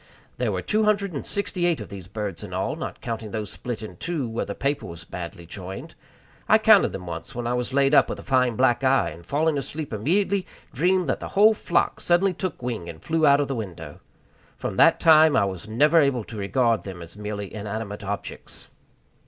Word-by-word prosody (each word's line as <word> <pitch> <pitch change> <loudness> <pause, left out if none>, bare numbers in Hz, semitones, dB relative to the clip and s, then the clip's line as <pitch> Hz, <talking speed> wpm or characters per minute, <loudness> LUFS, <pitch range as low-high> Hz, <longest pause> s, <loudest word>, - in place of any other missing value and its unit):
There - - +1
were - - -3
two 215 0 +2
hundred 200 -3 +1
and 140 - -4
sixty 185 -3 -1
eight 170 -6 +1
of 105 - -8
these 95 -3 -9
birds 100 -3 -5
in - - -7
all, - - -1
not - - -6
counting 115 -2 -4
those 105 -2 -4
split 120 -3 -5
in 110 - -9
two 155 -5 -2
where 115 +1 -3
the 100 - -5
paper 140 +1 -1
was 85 0 -9
badly 85 0 -8
joined. 95 +2 -8 0.6
I - - +8
counted - - +5
them 90 - -7
once 85 +9 -7
when 120 0 -4
I 120 - 0
was 125 +1 -2
laid 140 +1 +3
up - - +6
with - - -3
a - - -10
fine 125 -3 +2
black 120 +1 +2
eye, 135 +1 +3
and 85 +2 -12
falling 150 - +1
asleep 145 0 -5
immediately 185 - 0 0.3
dreamed 180 +4 +2
that 135 - 0
the - - -6
whole 215 +2 +7
flock 175 - 0
suddenly 180 +2 +3
took 180 -7 -5
wing 115 -9 -4
and 80 -2 -9
flew 160 - +1
out 140 0 +6
of 145 - -1
the 135 - -2
window. 85 - -7 0.6
From - - -4
that 165 - +6
time 155 -2 +6
I - - +4
was 95 0 -5
never 150 +9 +4
able 135 -5 +1
to 110 - -10
regard 115 +3 +1
them 95 -3 -8
as 85 +2 -11
merely 105 -2 -5
inanimate 105 0 -5
objects. 100 +1 -6
120 Hz, 220 wpm, -24 LUFS, 100-155 Hz, 0.6 s, I